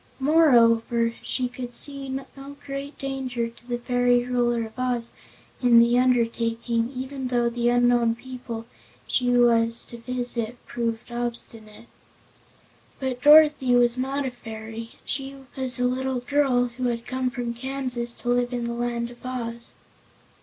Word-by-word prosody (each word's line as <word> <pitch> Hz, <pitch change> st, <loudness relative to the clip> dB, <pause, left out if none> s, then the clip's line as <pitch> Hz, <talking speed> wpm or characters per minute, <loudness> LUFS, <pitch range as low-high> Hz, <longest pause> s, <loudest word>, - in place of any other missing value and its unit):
Moreover 235 Hz, -6 st, +4 dB
she 255 Hz, -1 st, -1 dB
could 245 Hz, -1 st, -7 dB
see 275 Hz, -1 st, -1 dB
no 275 Hz, +1 st, -7 dB
great 275 Hz, +1 st, -6 dB
danger 265 Hz, -4 st, -3 dB
to 235 Hz, +1 st, -16 dB
the 240 Hz, -1 st, -1 dB
fairy 245 Hz, 0 st, +2 dB
Ruler 240 Hz, -2 st, +1 dB
of 220 Hz, -, -11 dB
Oz 245 Hz, -2 st, -1 dB, 0.5 s
in 245 Hz, -2 st, +6 dB
the 235 Hz, +1 st, +5 dB
undertaking, 235 Hz, -1 st, +1 dB
even 260 Hz, +1 st, -4 dB
though 240 Hz, -1 st, +1 dB
the 240 Hz, 0 st, +1 dB
unknown 240 Hz, -1 st, +3 dB
people 245 Hz, -2 st, -7 dB, 0.4 s
she 250 Hz, -1 st, +1 dB
was 235 Hz, -1 st, +4 dB
to 235 Hz, -, -10 dB
visit 245 Hz, -1 st, -3 dB
proved 235 Hz, 0 st, -3 dB
obstinate. 230 Hz, -2 st, -3 dB, 1.1 s
But 260 Hz, -2 st, -3 dB
Dorothy 295 Hz, -4 st, +6 dB
was 240 Hz, -1 st, +4 dB
not 270 Hz, +2 st, -2 dB
a 260 Hz, -, -2 dB
fairy; 225 Hz, -1 st, -8 dB
she 270 Hz, 0 st, -4 dB, 0.2 s
was 260 Hz, -1 st, 0 dB
a 250 Hz, -, +2 dB
little 255 Hz, 0 st, -1 dB
girl 265 Hz, -2 st, +2 dB
who 255 Hz, -, -2 dB
had 235 Hz, -1 st, -2 dB
come 255 Hz, 0 st, -1 dB
from 245 Hz, -2 st, -4 dB
Kansas 250 Hz, -1 st, -2 dB
to 240 Hz, -, -5 dB
live 245 Hz, 0 st, +1 dB
in 240 Hz, -1 st, -2 dB
the 235 Hz, -, -3 dB
Land 235 Hz, 0 st, -2 dB
of 240 Hz, -, -16 dB
Oz. 235 Hz, -2 st, -5 dB
245 Hz, 145 wpm, -25 LUFS, 235-255 Hz, 1.1 s, in